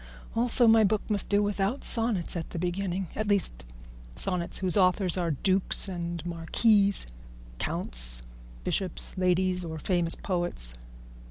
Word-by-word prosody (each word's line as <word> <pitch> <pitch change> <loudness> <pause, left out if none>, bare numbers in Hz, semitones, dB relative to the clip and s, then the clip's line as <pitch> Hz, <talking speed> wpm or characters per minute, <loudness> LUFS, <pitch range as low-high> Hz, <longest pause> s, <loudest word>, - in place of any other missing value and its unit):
Also 240 +1 +3
my 225 -1 +6
book 210 0 0
must 205 -2 0
do 205 0 +3
without 205 +5 -1
sonnets 225 -8 +1
at 165 -2 -4
the - - -6
beginning, 180 +2 -2
at 215 - -2
least 175 - +1 0.5
sonnets 175 - -2
whose 185 -3 +1
authors 185 -2 +4
are 175 -2 -1
dukes, 185 +7 +1 0.4
marquises, 200 +4 +2 0.5
counts, - - -1 0.4
bishops, 185 - -2
ladies, 185 0 +1
or 160 -2 -5
famous 170 +1 +1
poets. 175 - -2
185 Hz, 125 wpm, -28 LUFS, 170-205 Hz, 0.5 s, my